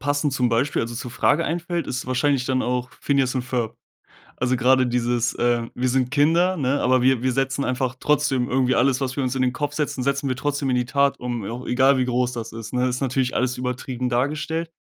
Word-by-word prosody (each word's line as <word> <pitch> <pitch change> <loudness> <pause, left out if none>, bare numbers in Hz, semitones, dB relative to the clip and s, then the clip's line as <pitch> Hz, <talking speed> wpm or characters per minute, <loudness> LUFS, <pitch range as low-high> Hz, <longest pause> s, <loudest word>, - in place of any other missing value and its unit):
passend 145 0 0
zum 125 -3 +1
Beispiel, 120 +4 +1
also 115 +1 -5
zur 125 0 -6
Frage 145 +6 +2
einfällt, 170 0 -2
ist 125 - -3
wahrscheinlich 130 0 +1
dann 130 -1 +1
auch 125 0 -2
„Phineas 135 -2 +1
and 125 - -1
Ferb“. 120 -3 -2 0.6
Also 125 0 +1
grade 130 +1 +3
dieses, 120 -1 0
äh: 120 -1 +1
„Wir 125 +1 0
sind 130 -1 +1
Kinder, 165 +6 +3
ne, 140 -1 0
aber 130 0 +3
wir 130 -2 +3
wir 130 0 +1
setzen 135 +1 0
einfach 130 0 -1
trotzdem 145 -4 +1
irgendwie 130 0 +2
alles, 130 +1 +2
was 130 -1 -2
wir - - +1
uns 130 0 -1
in 130 - 0
den 125 0 +1
Kopf 145 +1 -3
setzen 145 -4 -2
setzen 140 0 0
wir 130 - 0
trotzdem 145 +1 -1
in - - +2
die 125 - 0
Tat 140 +1 +1
um, 120 -3 -4
au 120 +5 -6
egal 135 +2 +4
wie 130 - +1
groß 125 0 0
das 115 -1 -6
ist“, 115 0 -8
ne? 125 0 +1
Ist 125 +1 -2
natürlich 130 -1 0
alles 125 0 0
übertrieben 125 0 -3
dargestellt, 155 +6 -1
130 Hz, 225 wpm, -23 LUFS, 125-140 Hz, 0.6 s, egal